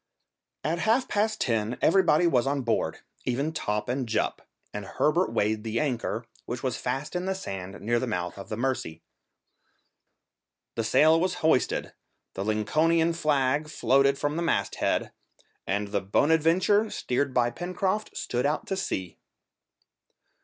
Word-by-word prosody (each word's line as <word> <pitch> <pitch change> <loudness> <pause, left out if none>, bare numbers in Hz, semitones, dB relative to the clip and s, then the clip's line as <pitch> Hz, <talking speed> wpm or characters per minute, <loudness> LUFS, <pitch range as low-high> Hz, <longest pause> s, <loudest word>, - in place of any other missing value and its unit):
At 160 +4 -1
half 230 +7 +2
past 215 +1 0
ten 115 0 0
everybody 175 -2 +4
was 135 -6 +3
on 140 -1 0
board, 115 -2 -1 0.2
even 140 +5 -1
Top 105 -7 -2
and 125 -1 -2
Jup, 110 - 0 0.3
and 105 - -4
Herbert 155 - +1
weighed 105 +1 0
the 115 +1 -1
anchor, 120 -4 -2 0.2
which 120 +1 -4
was 130 -3 0
fast 135 +6 -3
in 180 +1 -1
the 190 - 0
sand 95 - -6
near 120 +3 +1
the 130 - -2
mouth 90 -5 -3
of 95 - -9
the 110 - -3
Mercy. 120 -11 -2 1.7
The 115 - -2
sail 155 +8 +5
was 180 +1 0
hoisted, 160 -5 +2 0.4
the 95 - -3
Lincolnian 155 +11 +2
flag 150 -2 +1
floated 140 -2 +3
from 145 +2 -1
the - - -1
mast 100 -12 0
head, - - 0 0.6
and 100 +1 -1
the 100 -1 0
Bonadventure, 165 - +3
steered 135 -3 -1
by 120 -2 +2
Pencroft, 185 - -2
stood 125 +3 -1
out 150 - -1
to 195 - -2
sea. 95 - -4
135 Hz, 150 wpm, -27 LUFS, 110-165 Hz, 1.7 s, sail